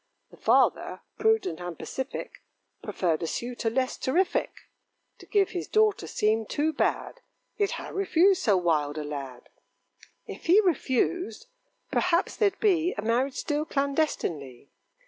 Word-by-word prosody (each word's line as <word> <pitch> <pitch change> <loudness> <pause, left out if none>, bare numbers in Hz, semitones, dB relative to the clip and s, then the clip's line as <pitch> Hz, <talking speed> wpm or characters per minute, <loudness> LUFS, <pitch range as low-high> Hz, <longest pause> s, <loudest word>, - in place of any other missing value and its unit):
The - - -16
father, - - +2 0.2
prudent 445 - +1
and 175 -2 -6
pacific, 265 +1 -6 0.4
Preferred 165 -4 -1
a 165 - -2
suitor 240 +4 -3
less 255 +3 -1
terrific: 350 +9 +1 0.7
To - - -14
give 395 -2 +2
his 355 -2 -4
daughter 430 -1 +2
seemed 220 0 0
too 310 +2 0
bad, - - -1 0.3
Yet 410 0 0
how - - -6
refuse 385 -1 +3
so 205 -5 +3
wild 155 -4 0
a 155 - -3
lad? 135 -4 -7 0.8
If - - -9
he 365 +5 +7
refused, 360 - 0 0.5
perhaps 360 0 +1
there'd 405 -3 +1
be 360 -5 +2
A 205 - -3
marriage 250 +4 +1
still 295 0 -1
clandestinely. 275 - -2
275 Hz, 135 wpm, -27 LUFS, -, 0.8 s, he